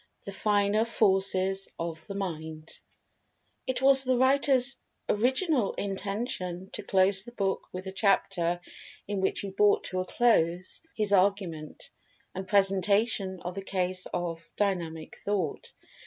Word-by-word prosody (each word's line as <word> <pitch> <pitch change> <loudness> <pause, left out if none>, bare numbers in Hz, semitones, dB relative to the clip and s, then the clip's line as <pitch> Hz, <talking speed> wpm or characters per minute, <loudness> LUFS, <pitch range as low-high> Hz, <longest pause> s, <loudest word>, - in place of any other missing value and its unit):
THE 200 - -5
FINER 205 +1 +2
FORCES 195 -3 +1
OF 165 -1 -5
THE 200 - -6
MIND 160 -4 -5 1.0
IT 260 0 -2
was 270 0 +7
the 255 -1 +2
writer's 265 0 +3 0.3
original 255 - +1
intention 195 -2 -4
to - - -4
close 195 -1 +2
the 240 - -11
book 195 -5 -2
with 185 +1 -6
the 190 - -5
chapter 190 -3 +1 0.5
in 200 -1 -2
which 190 - +1
he 200 - -5
brought 205 +1 +3
to 185 - -2
a 185 - -1
close 185 -6 +1
his 210 -2 0
argument, 185 -6 0 0.4
and 190 0 -6
presentation 195 0 +2
of 180 - -4
the 195 - -5
case 185 -1 -2
of 165 -2 -4
"Dynamic 170 -6 -2
Thought." 195 -7 -2
195 Hz, 135 wpm, -28 LUFS, 185-210 Hz, 1.0 s, was